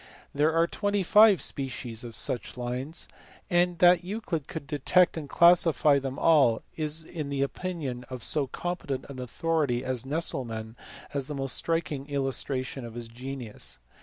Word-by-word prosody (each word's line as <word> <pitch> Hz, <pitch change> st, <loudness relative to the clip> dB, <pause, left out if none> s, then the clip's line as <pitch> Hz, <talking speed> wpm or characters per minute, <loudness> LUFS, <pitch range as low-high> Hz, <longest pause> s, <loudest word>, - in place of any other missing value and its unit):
There 150 Hz, +3 st, +3 dB
are 165 Hz, +1 st, +3 dB
twenty 205 Hz, +2 st, -1 dB
five 210 Hz, +1 st, +6 dB
species 125 Hz, -4 st, -4 dB
of 115 Hz, -2 st, -8 dB
such 125 Hz, -, -2 dB
lines, 125 Hz, +6 st, -3 dB, 0.4 s
and 175 Hz, 0 st, +3 dB
that 175 Hz, 0 st, +6 dB
Euclid 180 Hz, -6 st, -4 dB
could 160 Hz, -3 st, -6 dB
detect 155 Hz, +5 st, +3 dB
and 150 Hz, -3 st, -6 dB
classify 165 Hz, -4 st, +5 dB
them 135 Hz, 0 st, -5 dB
all 135 Hz, -9 st, +4 dB
is 155 Hz, 0 st, -2 dB
in 155 Hz, -5 st, -5 dB
the 140 Hz, -1 st, 0 dB
opinion 140 Hz, -6 st, -4 dB
of 130 Hz, -2 st, -6 dB
so 145 Hz, -3 st, +2 dB
competent 175 Hz, -4 st, -4 dB
an 135 Hz, -2 st, -8 dB
authority 130 Hz, -1 st, -1 dB
as 130 Hz, -3 st, -2 dB
Nesselmann 120 Hz, -7 st, -3 dB, 0.4 s
the 140 Hz, +1 st, -3 dB
most 135 Hz, -1 st, -2 dB
striking 155 Hz, -4 st, -1 dB
illustration 135 Hz, -1 st, -2 dB
of 115 Hz, -1 st, -8 dB
his 120 Hz, -1 st, -6 dB
genius. 120 Hz, -, -6 dB
140 Hz, 150 wpm, -28 LUFS, 130-165 Hz, 0.4 s, five